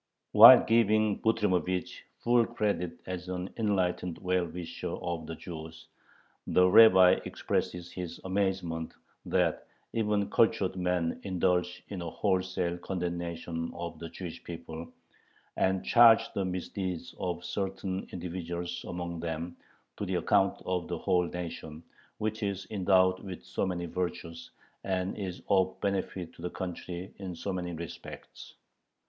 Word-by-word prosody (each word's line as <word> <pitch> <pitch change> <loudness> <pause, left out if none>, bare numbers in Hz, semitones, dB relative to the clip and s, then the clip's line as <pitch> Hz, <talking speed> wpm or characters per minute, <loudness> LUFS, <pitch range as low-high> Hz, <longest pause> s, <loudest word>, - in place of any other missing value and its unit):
While - - +11
giving 110 -2 +3
Butrymovich 95 -5 +1 0.3
full 120 0 +5
credit 105 -7 -2
as 90 0 -5
an 90 +1 -4
enlightened 90 -5 0
well 90 -1 0
wisher 90 +1 -6
of 85 -3 -4
the 80 - -5
Jews, 80 -1 -9 0.6
the 90 0 +5
Rabbi 95 -3 +8
expresses 90 -1 -2
his 90 -2 -6
amazement 95 -4 -1 0.3
that - - +1 0.3
even 105 -2 +1
cultured 110 -5 +2
men 90 -2 0
indulge 90 -2 0
in 95 -3 -5
a 85 - -4
wholesale 95 -2 -1
condemnation 85 -2 -3
of 85 -2 -6
the 85 0 -6
Jewish 90 -2 -8
people, 85 -1 -8 0.6
and 95 0 +1
charge 115 -2 +6
the 100 - -1
misdeeds 90 -1 -4
of 90 -1 -3
certain 95 0 -3
individuals 85 -1 -5
among 85 -1 -4
them 85 +1 -4 0.4
to 105 - -3
the 95 - -1
account 95 +3 +2
of 90 -1 -1
the - - -3
whole 90 -1 +1
nation, 85 -2 -6 0.3
which 110 +1 -2
is 100 -2 -2
endowed 95 -2 +3
with 95 -3 -8
so - - -1
many 90 -1 -2
virtues, 85 -1 -4 0.3
and 95 0 -1
is 95 -4 -5
of 95 -1 +2
benefit 95 -3 -2
to - - -14
the 90 - -3
country 90 +1 -6
in 95 -3 -5
so 95 +3 -4
many 90 -1 -3
respects. 85 0 -9
90 Hz, 135 wpm, -30 LUFS, 85-95 Hz, 0.6 s, While